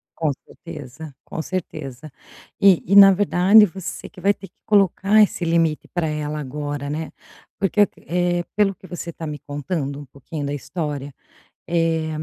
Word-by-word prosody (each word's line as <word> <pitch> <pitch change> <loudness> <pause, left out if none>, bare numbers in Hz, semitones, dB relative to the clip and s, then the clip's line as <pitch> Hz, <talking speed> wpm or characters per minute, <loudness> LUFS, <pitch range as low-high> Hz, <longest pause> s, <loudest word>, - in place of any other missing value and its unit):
Com 155 -3 0
certeza, 150 -2 -10
com 165 - -5
certeza. 155 -6 -6 0.5
E 195 -3 +5
e 195 - +2
na 200 -1 +10
verdade, 200 +2 +5
você 190 0 -7
que 210 - -15
vai 200 +1 +3
ter 195 -1 -12
que - - -36
colocar 205 +1 +4
esse 195 -3 +2
limite 165 -2 +1
para 175 -3 -2
ela 150 0 -3
agora, 145 0 -4
né. 155 +2 -4 0.5
Porque, 200 +1 +3 0.2
eh, 175 0 0
pelo 205 -2 +2
que 185 - -15
você 175 -1 -6
está 165 - -8
me 150 -1 -5
contando, 145 0 -4
um 145 - -9
pouquinho 140 +3 -7
da 140 - -3
história, 145 -2 -5 0.5
eh, 165 -2 0
165 Hz, 160 wpm, -22 LUFS, 145-185 Hz, 0.5 s, na